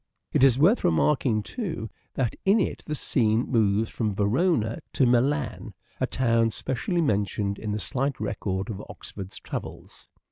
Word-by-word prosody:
It - - +3
is 130 -3 +6
worth 180 - +4
remarking, 110 - +2
too, 170 - -4 0.3
that 125 -4 0
in 200 +3 +4
it - - -1
the 155 - -2
scene 115 -4 +1
moves 110 -2 +2
from 105 -4 -1
Verona 115 - +1
to 135 - +3
Milan, 125 0 +1 0.2
a - - +1
town 115 -3 +2
specially 135 +10 -2
mentioned 100 - 0
in 105 - -3
the 105 - -1
slight 135 +4 -2
record 100 0 -2
of 100 - -6
Oxford's 95 -1 -8
travels. - - -8
115 Hz, 150 wpm, -26 LUFS, 105-140 Hz, 0.3 s, is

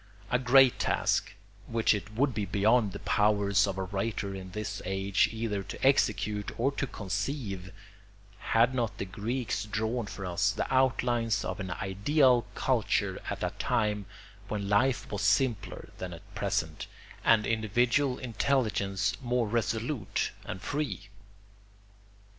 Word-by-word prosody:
A 125 - +3
great 130 0 +5
task, - - 0 0.3
which 115 -1 +2
it 105 0 -4
would 135 +2 +2
be 105 -1 -2
beyond 105 +3 +3
the - - -6
powers 100 -1 +3
of 95 -1 -3
a 95 - -1
writer 100 +1 -3
in 95 -1 -7
this 105 0 -5
age 95 +1 +1
either 110 -3 -2
to - - -5
execute 105 -1 +2
or 135 +4 +2
to 135 -1 -2
conceive, 100 - -4 0.7
had 115 +5 +3
not 120 -4 -1
the - - -3
Greeks 105 +3 -2
drawn 110 +2 -2
for 100 - -6
us 90 -1 +1
the - - -1
outlines 120 -4 +2
of - - -4
an 95 -1 -4
ideal 120 - +2
culture 105 -6 0
at - - -4
a - - 0
time 105 -3 0 0.4
when 100 -1 -3
life 120 +6 +2
was 105 0 -2
simpler 105 +1 0
than 90 -1 -5
at 100 +5 -13
present 100 -6 -2 0.4
and 110 -2 +4
individual 120 +5 +1
intelligence 110 -6 0
more 120 -2 0
resolute 115 +2 -1
and 95 - -6
free. 125 -10 -3
105 Hz, 140 wpm, -29 LUFS, 100-120 Hz, 0.7 s, great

